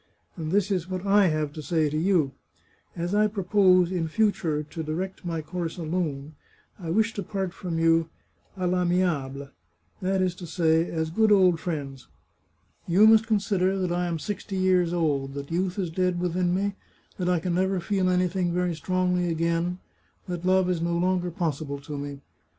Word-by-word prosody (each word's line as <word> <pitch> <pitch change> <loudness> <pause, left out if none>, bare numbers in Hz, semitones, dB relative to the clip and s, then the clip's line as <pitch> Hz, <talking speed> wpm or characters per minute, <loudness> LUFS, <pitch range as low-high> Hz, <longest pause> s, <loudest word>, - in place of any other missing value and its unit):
And 160 -3 -4
this 205 +1 +2
is 185 -2 -1
what 185 0 -4
I 200 0 +5
have 155 -2 -1
to 155 - -7
say 160 0 +1
to 150 - -3
you: 160 -4 +2 0.6
As 175 +2 -3
I 210 +1 +4
propose, 185 -3 +3
in 175 -3 -1
future, 165 -6 0
to 155 +2 -7
direct 175 +6 -4
my 165 -3 -3
course 170 +1 -4
alone, 155 -4 -3 0.5
I 170 -3 -6
wish 220 +5 +2
to 200 - -4
part 190 -1 -3
from 175 -4 -4
you 165 0 +3 0.2
* - - -34
d, 185 - -4
I' 180 0 +1
amiable 155 -7 0 0.2
' 85 0 -45
— 90 - -38
that 190 0 +1
is 180 -1 0
to 175 - -8
say, 165 0 +2
as 160 -1 -2
good 220 +5 +3
old 185 -4 +5
friends. 140 -6 -5 0.8
You 185 +5 +5
must 220 0 +6
consider 195 -3 +1
that 185 -2 -1
I 175 0 0
am 170 -1 -2
sixty 200 +3 -5
years 185 -2 +3
old, 145 -5 -1
that 140 +1 -6
youth 180 +3 -1
is 180 -4 -2
dead 180 +1 0
within 180 0 0
me, 200 +1 0 0.5
that 180 -1 0
I 180 -2 +2
can 175 +2 -2
never 190 +1 +1
feel 185 +1 0
any 180 0 +2
thing 180 -1 -1
very 180 0 0
strongly 180 +1 0
again, 170 +2 0 0.5
that 175 -1 -4
love 185 0 +3
is 180 -2 0
no 170 0 0
longer 180 0 +1
possible 155 -5 -3
to 150 +1 -7
me. 140 -1 -6
175 Hz, 195 wpm, -26 LUFS, 160-185 Hz, 0.8 s, must